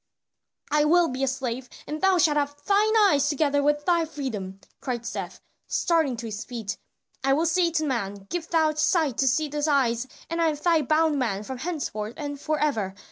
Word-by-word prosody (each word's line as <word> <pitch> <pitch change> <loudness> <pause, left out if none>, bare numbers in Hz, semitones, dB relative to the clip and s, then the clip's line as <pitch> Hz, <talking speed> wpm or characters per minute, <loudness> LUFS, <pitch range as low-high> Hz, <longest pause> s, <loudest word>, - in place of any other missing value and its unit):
"I 300 0 +4
will 335 +2 +4
be 255 +1 -3
a - - +2
slave, 255 -1 -3 0.2
and 305 +1 -5
thou 385 -1 +4
shalt 310 -3 +3
have 290 0 -1
thine 415 +2 +3
eyes 290 -8 +4
together 290 -1 +1
with 295 +1 +1
thy 340 -2 +3
freedom," 220 -12 -5 0.2
cried 240 -3 -4
Seth, - - -5 0.3
starting 320 -8 +1
to 235 - -6
his 215 -1 -5
feet. 225 -5 -5 0.5
"I 270 0 +3
will 315 +4 +2
say 340 +1 +2
to 315 -1 -1
the - - -1
man, 200 -6 -3
give 340 -2 -3
thou 315 -2 +3
sight 305 - +1
to 270 - +3
these 295 +2 0
eyes 260 -4 +1 0.2
and 335 0 -2
I 330 - +4
am 310 - +1
thy 320 +2 +2
bondman 285 -9 +1
from 260 +3 -6
henceforth 245 -9 -4
and 285 -2 -5
forever. 290 -11 -1
290 Hz, 190 wpm, -25 LUFS, 250-320 Hz, 0.5 s, I